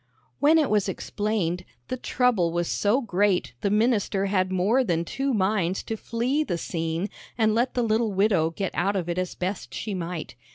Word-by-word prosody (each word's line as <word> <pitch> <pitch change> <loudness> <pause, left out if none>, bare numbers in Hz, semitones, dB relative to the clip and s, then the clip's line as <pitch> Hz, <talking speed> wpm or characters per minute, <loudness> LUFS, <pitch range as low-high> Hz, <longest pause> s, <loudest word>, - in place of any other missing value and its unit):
When 305 +3 +5
it 305 -7 +2
was 205 -2 +2
explained, 190 -3 -2 0.2
the - - -2
trouble 240 -9 +1
was 175 0 -1
so 215 +7 +2
great 200 - +1
the 200 - +1
minister 210 -2 +2
had 185 -2 +1
more 200 +8 +3
than 170 -6 0
two 270 +9 -1
minds 190 -4 +1
to 225 - -3
flee 245 +7 -1
the 175 - -2
scene 165 +2 -2 0.3
and 220 -2 +3
let 240 +3 +1
the 245 - +2
little 220 0 +1
widow 190 -5 +2
get 190 +3 -3
out 195 +3 0
of 180 -3 -1
it 175 +1 -1
as 185 -1 -3
best 185 +2 -4
she 210 - -3
might. 175 -3 -4
200 Hz, 190 wpm, -26 LUFS, 180-225 Hz, 0.3 s, When